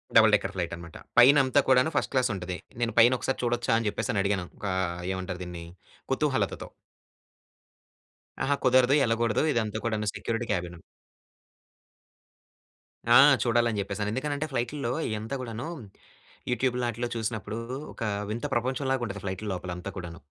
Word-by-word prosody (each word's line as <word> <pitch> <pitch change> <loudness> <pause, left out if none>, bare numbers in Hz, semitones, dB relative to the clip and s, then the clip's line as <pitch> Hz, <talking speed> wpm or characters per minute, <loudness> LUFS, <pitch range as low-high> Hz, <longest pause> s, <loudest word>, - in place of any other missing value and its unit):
Double 110 -1 +7
decker 100 -1 -2
ఫ్లైటనమాట. 85 -2 -5 0.2
పైనంతా 135 +2 +6
కూడాను 130 +4 +4
first - - 0
క్లాసుంటది. 95 -8 0 0.2
నేను 115 0 0
పైనొకసారి 125 +3 +3
చూడొచ్చా 120 -1 +1
అని 115 -1 -1
చెప్పేసనడిగాను. 100 -2 -1
ఒకా 95 -2 -2 0.4
ఏమంటారు 95 -1 -4
దీన్ని 90 -1 -7 0.5
కుతూహలతతో. - - 0 1.8
అహా! 145 +1 +2
కుదరదు, 130 +1 +5
యెళ్ళగూడదు, 115 -2 +1
ఇదంతా 110 -2 -1
కూడాను 110 -2 -1
సెక్యూరిటీ 115 +1 -3
క్యాబిను. 90 -3 -3 2.3
ఆ! - - +10 0.3
చూడాలని 120 -2 +2
జెప్పేసని. 100 +1 -2
ఎందుకనంటే, 145 +4 -2
ఫ్లైటుల్లో 120 0 -2 0.2
ఈ - - -3
యంతా 110 +5 -4
గూడానూ, 115 +2 -5 0.8
యూట్యూబుల్లో, 125 0 0
ఆటిల్లో 120 +1 -3
చూసినప్పుడూ, 110 -1 -3 0.3
ఒక - - -6 0.3
వింత 115 +5 -3
ప్రపంచం 130 +3 -1
లాగుంటది, 115 -6 -3
ఫ్లైటుల్లోపలంతా 95 -2 -4
కూడాను. 85 -3 -7
115 Hz, 120 wpm, -27 LUFS, 100-125 Hz, 2.3 s, ఆ